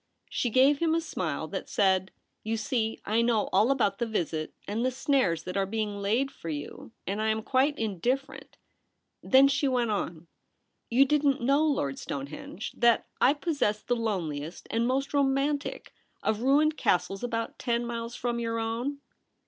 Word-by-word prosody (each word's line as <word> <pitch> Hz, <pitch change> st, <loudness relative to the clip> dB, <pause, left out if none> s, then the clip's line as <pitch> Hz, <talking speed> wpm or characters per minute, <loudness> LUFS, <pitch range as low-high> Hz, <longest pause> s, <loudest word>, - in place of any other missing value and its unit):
She 245 Hz, -, 0 dB
gave 270 Hz, +5 st, +4 dB
him 330 Hz, -1 st, +2 dB
a -, -, +2 dB
smile 330 Hz, -, -3 dB
that -, -, -5 dB
said, 190 Hz, -2 st, +2 dB, 0.2 s
' -, -, -49 dB
You 225 Hz, +1 st, -1 dB
see 220 Hz, 0 st, -1 dB
I 220 Hz, +3 st, +2 dB
know 235 Hz, -3 st, +1 dB
all 205 Hz, +6 st, +4 dB
about 225 Hz, -8 st, +1 dB
the 235 Hz, -, 0 dB
visit 160 Hz, -7 st, -2 dB, 0.2 s
and 215 Hz, +4 st, -1 dB
the 255 Hz, -, +2 dB
snares 255 Hz, -, +1 dB
that 180 Hz, -, -6 dB
are 195 Hz, -1 st, +1 dB
being 210 Hz, 0 st, -2 dB
laid 225 Hz, +7 st, 0 dB
for 165 Hz, -, -8 dB
you, 145 Hz, +8 st, -6 dB
and 200 Hz, +3 st, -2 dB
I 220 Hz, -, +1 dB
am 220 Hz, 0 st, 0 dB
quite 275 Hz, +4 st, +2 dB
indifferent.' 235 Hz, -, -2 dB, 0.6 s
Then 265 Hz, +1 st, +6 dB
she 280 Hz, +1 st, +1 dB
went 245 Hz, -4 st, +1 dB
on: 170 Hz, -5 st, -3 dB, 0.3 s
' -, -, -49 dB
You 260 Hz, +4 st, +5 dB
didn't 285 Hz, -2 st, +2 dB
know, 280 Hz, +4 st, +3 dB
Lord 145 Hz, -, 0 dB
Stonehenge, 145 Hz, -, -6 dB
that 235 Hz, -1 st, +4 dB, 0.2 s
I 275 Hz, +4 st, +5 dB
possess 280 Hz, -10 st, -1 dB
the 245 Hz, -, 0 dB
loneliest 170 Hz, -9 st, -3 dB
and 230 Hz, +1 st, +1 dB
most 270 Hz, +3 st, -1 dB
romantic 280 Hz, +1 st, 0 dB, 0.3 s
of 220 Hz, 0 st, 0 dB
ruined 300 Hz, +4 st, +3 dB
castles 180 Hz, +3 st, 0 dB
about 230 Hz, -1 st, -3 dB
ten 235 Hz, -1 st, 0 dB
miles 235 Hz, 0 st, -4 dB
from 240 Hz, -1 st, -2 dB
your 230 Hz, -1 st, -2 dB
own 235 Hz, +5 st, -2 dB
235 Hz, 175 wpm, -28 LUFS, 205-270 Hz, 0.6 s, Then